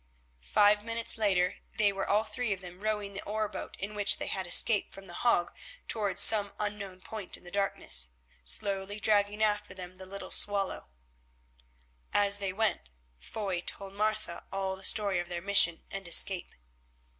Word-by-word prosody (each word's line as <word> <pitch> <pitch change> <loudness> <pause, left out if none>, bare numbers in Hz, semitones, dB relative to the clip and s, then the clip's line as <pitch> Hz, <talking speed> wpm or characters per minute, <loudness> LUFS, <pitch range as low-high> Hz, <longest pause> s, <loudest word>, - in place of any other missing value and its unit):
Five 205 0 +4
minutes 230 0 +2
later 190 -3 +1 0.2
they 205 -2 +3
were 195 0 -4
all 210 +2 +3
three 245 -1 -4
of 190 - -8
them 180 -1 -11
rowing 210 -1 -3
the 195 - -6
oar 215 +1 -2
boat 200 - -8
in 200 +2 -5
which 205 -1 +4
they - - -5
had 190 -2 -4
escaped 205 +4 +4
from 195 - -12
The 175 - -10
Hague 175 -4 +1 0.4
towards 205 -4 +1
some 205 -2 +4
unknown 200 -3 -5
point 215 -2 -4
in - - -20
the 175 - -12
darkness, 65 - 0 0.3
slowly 195 - -2
dragging 210 0 +2
after 210 -1 -1
them 185 0 -9
the 190 0 -10
little 200 +1 -8
ship - - +7
Swallow. 200 - -3 1.3
As 205 0 +4
they 195 -2 -2
went, 195 - -1 0.3
Foy 190 - -4
told 195 +2 -8
Martha 215 -4 -2
all 195 -1 -3
the 190 - -12
story 200 -2 +4
of 175 0 -5
their 175 -1 -4
mission 170 -3 +4
and 195 -2 -6
escape. 180 +2 +2
200 Hz, 175 wpm, -30 LUFS, 185-210 Hz, 1.3 s, ship